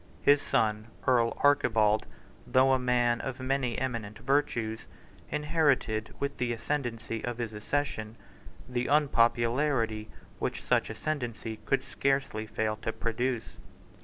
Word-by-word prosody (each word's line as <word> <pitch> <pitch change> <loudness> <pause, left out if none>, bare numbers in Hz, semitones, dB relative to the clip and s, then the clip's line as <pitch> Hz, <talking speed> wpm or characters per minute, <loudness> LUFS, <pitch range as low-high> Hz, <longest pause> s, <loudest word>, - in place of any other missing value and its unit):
His 145 0 +6
son, 110 0 0 0.2
Earl 120 -2 +3
Archibald, 110 -7 +3 0.4
though 130 +1 +4
a 130 - +3
man 120 -2 +2
of 135 -1 -5
many 130 -2 0
eminent 115 -5 -3
virtues, 115 -3 0 0.4
inherited, 145 -8 +1
with 140 0 -2
the 120 -1 0
ascendancy 115 -3 -3
of 120 -1 -3
his 115 -2 -3
ancestors, 110 -1 -2 0.5
the 125 -1 -1
unpopularity 120 -4 +2 0.3
which - - -3
such - - +2
ascendancy 120 -7 -4
could 135 - +2
scarcely 135 -6 -1
fail 110 0 -1
to 110 +1 -3
produce. 120 +1 -2
120 Hz, 120 wpm, -29 LUFS, 110-135 Hz, 0.5 s, His